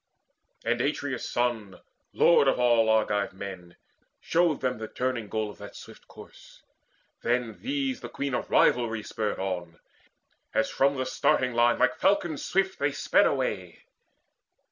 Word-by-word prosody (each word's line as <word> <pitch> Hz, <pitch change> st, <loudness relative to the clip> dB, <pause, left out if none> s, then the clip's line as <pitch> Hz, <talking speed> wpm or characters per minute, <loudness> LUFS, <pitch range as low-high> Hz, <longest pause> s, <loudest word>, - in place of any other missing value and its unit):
And 120 Hz, +1 st, +1 dB
Atreus' 140 Hz, -2 st, -2 dB
son, 115 Hz, -5 st, -2 dB, 0.3 s
lord 170 Hz, -5 st, +4 dB
of 135 Hz, -, +3 dB
all 120 Hz, -2 st, +4 dB
Argive 105 Hz, -2 st, +1 dB
men, 95 Hz, -3 st, -9 dB, 0.4 s
Showed 165 Hz, -3 st, +1 dB
them 125 Hz, -4 st, -1 dB
the 110 Hz, -, -5 dB
turning 125 Hz, -4 st, -3 dB
goal 110 Hz, -1 st, -2 dB
of -, -, -17 dB
that 100 Hz, -, -10 dB
swift -, -, -13 dB
course. -, -, -15 dB, 0.6 s
Then 120 Hz, -2 st, -1 dB
these 270 Hz, -1 st, -2 dB
the -, -, -7 dB
Queen 140 Hz, -1 st, -4 dB
of -, -, -2 dB
Rivalry 115 Hz, -3 st, +2 dB
spurred 110 Hz, -1 st, -3 dB
on, 90 Hz, -3 st, -4 dB, 0.8 s
As -, -, +1 dB
from 140 Hz, +1 st, +2 dB
the 130 Hz, -, -1 dB
starting 130 Hz, 0 st, +1 dB
line 120 Hz, 0 st, +3 dB
like -, -, +1 dB
falcons 175 Hz, -6 st, +1 dB
swift 190 Hz, 0 st, 0 dB
They 145 Hz, 0 st, 0 dB
sped -, -, +3 dB
away. 100 Hz, -10 st, -3 dB
120 Hz, 145 wpm, -27 LUFS, 105-140 Hz, 0.8 s, lord